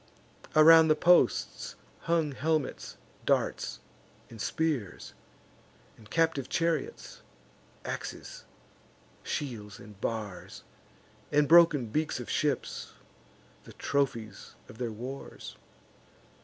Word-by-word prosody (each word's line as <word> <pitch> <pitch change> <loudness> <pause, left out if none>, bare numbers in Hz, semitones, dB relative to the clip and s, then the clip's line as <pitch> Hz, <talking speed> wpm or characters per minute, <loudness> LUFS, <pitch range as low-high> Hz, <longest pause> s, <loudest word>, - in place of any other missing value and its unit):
Around 160 +1 +8
the 155 - +4
posts 175 +3 +2 0.2
hung 165 -3 0
helmets, 155 +2 -2 0.3
darts, - - 0 0.5
and 115 -2 -9
spears, 140 - -2 0.8
And 110 -2 -17
captive 165 -5 +1
chariots, 170 - -2 0.6
axes, - - -6 0.8
shields, 110 -9 -5
and 105 -1 -14
bars, 105 -5 -5 0.7
And 150 0 +3
broken 165 -5 +6
beaks 150 +6 -2
of 125 - -6
ships, 150 -2 -2 0.7
the - - -13
trophies 115 -8 -2
of 110 - -14
their 120 -2 -2
wars. 125 +5 -8
140 Hz, 90 wpm, -29 LUFS, 115-160 Hz, 0.8 s, Around